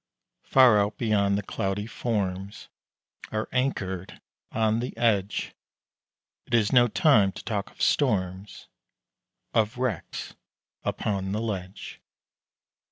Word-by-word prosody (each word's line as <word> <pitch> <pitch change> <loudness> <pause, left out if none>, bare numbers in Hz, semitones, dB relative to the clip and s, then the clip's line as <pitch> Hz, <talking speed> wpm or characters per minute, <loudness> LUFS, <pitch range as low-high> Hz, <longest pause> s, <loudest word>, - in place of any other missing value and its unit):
Far 125 -5 +6
out 100 +1 0
beyond 100 -4 +2
the 105 - -3
cloudy 95 +1 -2
forms 100 -4 -3 0.6
Are 110 0 -2
anchored 95 -8 -2 0.3
on 110 0 +1
the 125 -1 -5
edge 105 -4 0 0.9
It 120 - +1
is 110 0 +2
no 120 -1 +6
time 110 - +4
to - - -9
talk 105 -3 -3
of - - -6
storms, 95 -7 0 0.9
Of 110 +2 +1
wrecks 125 -7 -3 0.5
upon 95 -2 -2
the 105 - -1
ledge. 100 -4 -5
105 Hz, 110 wpm, -26 LUFS, 100-115 Hz, 0.9 s, Far